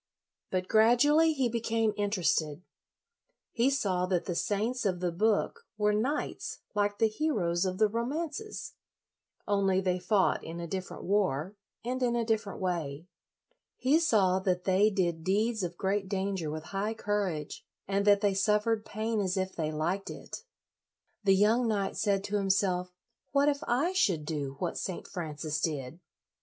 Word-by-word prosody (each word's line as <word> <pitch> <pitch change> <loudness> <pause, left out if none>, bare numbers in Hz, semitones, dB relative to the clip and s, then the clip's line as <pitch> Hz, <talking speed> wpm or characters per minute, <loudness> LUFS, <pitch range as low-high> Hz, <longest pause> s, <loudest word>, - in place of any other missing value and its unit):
But 185 0 -1
gradually 275 +9 +5
he 270 -5 +1
became 225 -2 0
in 205 0 0
56 185 -5 +2
LOYOLA 150 -2 -7
terested. - - -24 0.9
He 240 +3 +2
saw 190 -9 0
that 180 -2 0
the 180 - -2
saints 215 +8 -1
of 185 -4 0
the 180 -1 -1
book 220 - 0
were 210 0 +2
knights 255 +8 -2 0.2
like 205 -1 0
the 225 - +4
heroes 210 - 0
of 185 0 -2
the 215 +1 +4
romances, 305 - -4 0.7
only 195 -2 +2
they 185 -1 0
fought 190 +1 +2
in 165 +1 -6
a 170 - -4
different 185 +2 -5
war 190 -3 0 0.3
and 255 +2 -2
in 240 -1 +2
a 235 -1 0
different 220 -2 -1
way. 165 -5 -2 0.7
He 280 +5 +3
saw 195 - +3
that 180 -1 0
they 195 +3 +4
did 175 -5 -1
deeds 215 +5 +1
of 175 -1 -4
great 195 0 -1
danger 190 -4 -2
with 155 +1 -5
high 210 +3 -1
courage, 200 -8 -2 0.2
and 200 +1 +1
that 205 -1 +5
they 205 -2 +2
suffered 210 +3 +1
pain 220 +1 -2
as 185 -1 -1
if 190 0 -2
they 155 -2 -2
liked 170 +6 -2
it. - - -8 0.8
The 195 -1 +6
young 220 +5 +3
knight 200 -3 -1
said 200 -2 +1
to 205 +1 -1
himself, 190 -2 +1 0.4
"What 285 +1 +4
if 285 -1 -2
I 285 +10 +1
should 185 - +1
do 145 -3 -3
what 175 +1 -3
St. 185 - -5
Francis 155 -3 -4
did?" 150 -1 -3
200 Hz, 165 wpm, -30 LUFS, 180-225 Hz, 0.9 s, The